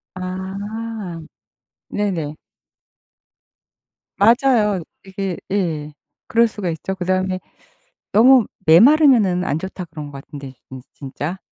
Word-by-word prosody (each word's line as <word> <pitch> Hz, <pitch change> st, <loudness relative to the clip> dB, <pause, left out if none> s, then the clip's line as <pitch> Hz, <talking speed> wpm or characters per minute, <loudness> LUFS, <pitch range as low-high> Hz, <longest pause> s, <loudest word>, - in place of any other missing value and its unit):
아. 190 Hz, +1 st, -5 dB, 0.7 s
네네. 175 Hz, -8 st, -2 dB, 1.8 s
맞아요. 225 Hz, -, +3 dB, 0.2 s
이게 190 Hz, -2 st, -4 dB
예 160 Hz, -7 st, -2 dB, 0.3 s
그럴 230 Hz, +1 st, +4 dB
수가 210 Hz, -5 st, -4 dB
있죠. 165 Hz, +4 st, -4 dB
그다음에 185 Hz, 0 st, -1 dB, 0.7 s
"너무 245 Hz, +2 st, +6 dB, 0.2 s
메마르면은 215 Hz, -, +6 dB
안 150 Hz, -, -1 dB
좋다." 190 Hz, +1 st, -6 dB
그런 155 Hz, -2 st, -8 dB
것 140 Hz, -1 st, -9 dB
같은데, 140 Hz, -3 st, -10 dB
진 130 Hz, -1 st, -9 dB
진짜. 145 Hz, +6 st, -6 dB
190 Hz, 200 characters per minute, -20 LUFS, 165-215 Hz, 1.8 s, 너무